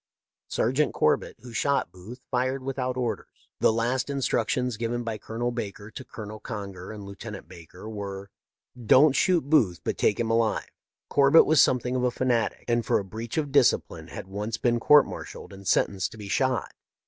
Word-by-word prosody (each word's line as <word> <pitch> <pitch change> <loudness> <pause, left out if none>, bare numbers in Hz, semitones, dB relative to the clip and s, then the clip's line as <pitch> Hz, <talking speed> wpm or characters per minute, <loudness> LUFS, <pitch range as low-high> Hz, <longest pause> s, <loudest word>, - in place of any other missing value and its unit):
" - - -66
Sergeant 130 +6 0
Corbett, - - +1
who 120 -1 -11
shot 140 -5 0
Booth, 105 +9 -11
fired 130 +1 0
with 135 +1 -4
out 125 0 -2
orders. 125 -2 -2 0.3
The - - +4
last 120 +4 0
instructions 125 -2 0
given 120 +2 -2
by 115 -2 -4
Colonel 120 +4 -3
Baker 105 -3 -6
to 130 - -8
Colonel 110 -3 -9
Conger 100 -5 -7
and 105 -2 -8
Lieutenant 100 -2 -9
Baker 90 +2 -12
were: 100 -2 -6 0.3
' 120 -2 -16
Don't 140 +1 +7
shoot 170 -3 +2
Booth, 110 - +3
but - - -3
take 105 - +2
him 115 -1 0
alive.' 115 -1 0 0.4
Corbett 140 +3 +6
was 155 -2 +5
something 125 0 +2
of 125 - 0
a 125 - +3
fanatic, 120 -3 -1
and 120 -1 +1
for - - +2
a 100 - -3
breach 110 +5 -6
of 145 -3 -1
discipline 140 -3 +2
had - - -8
once 105 +3 -4
been 120 -1 +1
court 150 +5 +6
martialled - - -9
and 95 0 -10
sentenced 95 0 +1
to - - -12
be 105 -2 -8
shot. 130 +1 0
115 Hz, 190 wpm, -26 LUFS, 105-130 Hz, 0.4 s, Don't